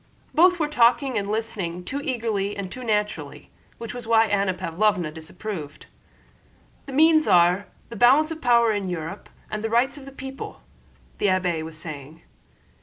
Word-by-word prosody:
Both 360 +3 +5
were 310 -3 0
talking 260 -1 +3
and 200 0 -4
listening 205 -6 -3
too 280 +9 -4
eagerly 220 -7 -2
and 190 -2 -5
too 255 - -7
naturally, 210 -2 -2 0.3
which 230 -1 -7
was 245 -2 -8
why 225 -1 +5
Anna 200 -2 +1
Pávlovna 180 -2 0
disapproved. 160 -1 -7 1.0
"The - - -7
means 315 +3 +4
are... 180 +1 +4 0.2
the 235 - -8
balance 270 +8 +5
of 320 0 -6
power 235 -2 +4
in 200 -3 -2
Europe 170 +2 -6 0.2
and 215 0 -4
the 225 - -1
rights 260 +5 +1
of 270 - -12
the 275 - -10
people," 265 0 -8 0.6
the - - +2
abbé 180 -4 +1
was 160 0 -8
saying. 155 0 -9
215 Hz, 165 wpm, -24 LUFS, 180-255 Hz, 1.0 s, Both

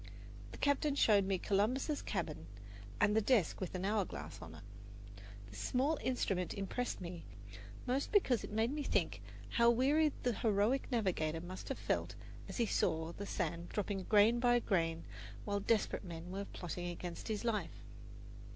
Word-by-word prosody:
The - - -9
captain 285 0 +2
showed 205 -7 +5
me 190 -1 +1
Columbus's 245 - +1
cabin 165 - -3 0.5
and 210 - +4
the 220 - +5
desk 210 - +2
with 185 0 -3
an 185 +1 -2
hour 210 0 +2
glass - - -8
on 80 -1 -9
it. 90 - -12 0.8
This 100 0 -10
small 260 - +1
instrument 195 -8 -1
impressed 200 +5 -2
me 175 -1 -6 0.6
most 260 +3 0
because 265 - +3
it - - -6
made 220 +3 +1
me 295 +1 -2
think 160 - 0 0.3
how 235 0 +4
weary 285 +6 +4
the 245 - +2
heroic 220 +6 +1
navigator 175 -9 0
must 185 +2 -7
have 270 - -2
felt - - -1 0.3
as - - -5
he 235 - +3
saw 160 -5 0
the 200 +3 -7
sand 170 -1 -2
dropping 200 -1 -2
grain 220 +3 +5
by 240 0 +4
grain 165 -7 0 0.4
while 205 -1 0
desperate 215 +1 +1
men 170 0 -7
were 200 +1 -3
plotting 175 -1 -5
against 175 0 -6
his 220 0 -2
life. 225 -3 -2
205 Hz, 165 wpm, -36 LUFS, 175-240 Hz, 0.8 s, showed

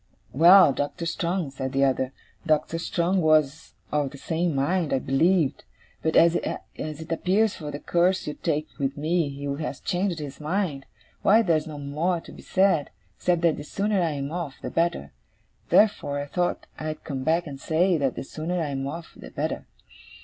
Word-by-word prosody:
'Well, 170 +1 +8
Doctor 145 +5 -3
Strong,' 170 -2 -1
said 130 0 -4
the 135 +1 +2
other 130 -1 0 0.3
'Doctor 160 +1 +1
Strong 175 +2 0
was 155 -2 +2 0.2
of 145 -2 +1
the 140 - -11
same 165 +2 -1
mind, 160 +4 0
I - - +3
believed. 150 +4 +2 0.4
But 160 - 0
as 170 +1 +6
it 155 +2 -6
appears 190 +6 +2
from 150 -2 -7
the 145 - -4
course 180 +4 +1
you 150 - -3
take 150 +1 -2
with 140 0 -1
me 160 +1 +1
he 140 0 -8 0.2
has 145 -3 -4
changed 185 -1 -1
his 145 -3 -7
mind, 155 -4 -2 0.3
why 220 +3 +5
there's 160 -5 +1
no 155 -2 -7
more 155 +5 -1
to - - -13
be - - -12
said, 190 -6 +2 0.3
except 175 -2 +1
that 165 -2 +3
the 145 - -6
sooner 200 +5 0
I 165 -3 0
am 140 0 -4
off, 165 -5 -4
the - - -4
better. 165 - 0 0.6
Therefore, 170 -9 +3
I 145 - -3
thought 175 +4 -1
I'd 155 0 -5
come 135 -3 -4
back 165 +4 +2
and 140 -3 -8
say, 170 +3 +2
that 135 -3 0
the - - -4
sooner 160 +6 -3
I 155 -3 -1
am 135 -1 -3
off 165 +3 -7
the - - -11
better. - - -3
160 Hz, 185 wpm, -25 LUFS, 145-175 Hz, 0.6 s, Well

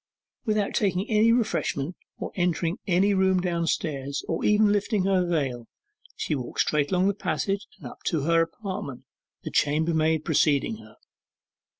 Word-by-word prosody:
Without 215 -2 0
taking 195 0 0
any 220 +2 +5
refreshment, 185 - 0 0.2
or - - -5
entering 175 +2 0
any 195 +2 +3
room 190 -1 +3
downstairs, 165 -5 -2
or - - -2
even 210 0 +4
lifting 205 -1 +1
her 185 -2 +2
veil, 130 -8 -1 0.5
she - - -2
walked 130 -4 -2
straight 145 -1 +1
along 185 0 +3
the 200 - +2
passage 195 +2 -2
and - - -14
up - - -16
to 160 -5 0
her 165 +3 +3
apartment, 185 - -5 0.4
the - - -5
chambermaid 160 +1 +1
preceding 155 +6 +2
her. - - -15
180 Hz, 145 wpm, -26 LUFS, 155-200 Hz, 0.5 s, any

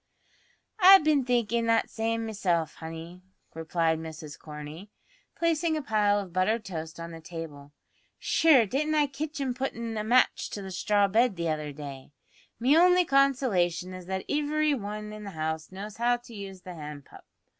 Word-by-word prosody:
"I've 385 -2 +9
bin 295 -4 +3
thinkin' 235 -2 +1
that 230 0 +2
same 225 0 -1
meself, 180 -7 -1
honey," 165 +2 -8 0.3
replied 160 0 0
Mrs 160 -2 -8
Corney, 150 +5 -9 0.5
placing 335 -1 +1
a 305 - -4
pile 210 -3 +2
of 190 -4 -7
buttered 215 +5 +1
toast 165 -2 -6
on 170 0 -6
the 165 0 -9
table. 160 -4 -8 0.5
"Shure 295 -8 +4
didn't 300 +8 -1
I 300 -1 +4
kitch 295 +2 -5
him 265 -2 -1
puttin' 235 -3 -4
a - - -2
match 245 +4 +2
to 200 - -5
the 190 - -7
straw 200 +2 +2
bed 225 +2 +2
the 170 -1 -2
other 150 -1 -2
day! 140 -1 -9 0.5
Me 260 +5 +4
only 360 +1 +5
consolation 235 - +2
is 185 -1 -9
that 190 0 -3
ivery 300 +1 +1
wan 210 -3 -5
in 215 0 -8
the 200 - -6
house 160 +1 -3
knows 200 +2 -8
how 240 +1 +2
to 240 -1 -15
use 195 -3 -8
the 185 -1 -9
hand 150 -3 -8
pump. - - -15
205 Hz, 175 wpm, -28 LUFS, 165-255 Hz, 0.5 s, I've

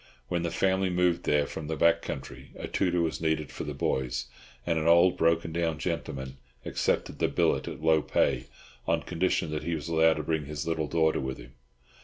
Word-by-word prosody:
When 85 -1 0
the 85 - -1
family 95 +2 +1
moved 90 -1 +1
there 75 -1 +3
from 75 +1 -6
the 80 - -2
back 85 +1 +4
country 70 0 -7
a - - -6
tutor 90 -2 +1
was 80 - -2
needed 80 -2 0
for - - -6
the - - -5
boys, 65 -1 -1 0.4
and 85 -2 +1
an 80 - -1
old 85 +2 +6
broken 85 0 +2
down 80 -1 -1
gentleman 65 -2 -4 0.3
accepted - - -1
the - - +3
billet - - +1
at - - -7
low 80 -1 +4
pay, - - +1 0.4
on - - +1
condition 85 -2 0
that 75 - -2
he 85 - -2
was 75 0 -5
allowed 80 0 +4
to 75 - -3
bring 80 -1 -1
his 75 +2 -5
little 80 -2 -1
daughter 80 0 +2
with 65 -1 -3
him. - - -13
80 Hz, 205 wpm, -28 LUFS, 75-85 Hz, 0.4 s, old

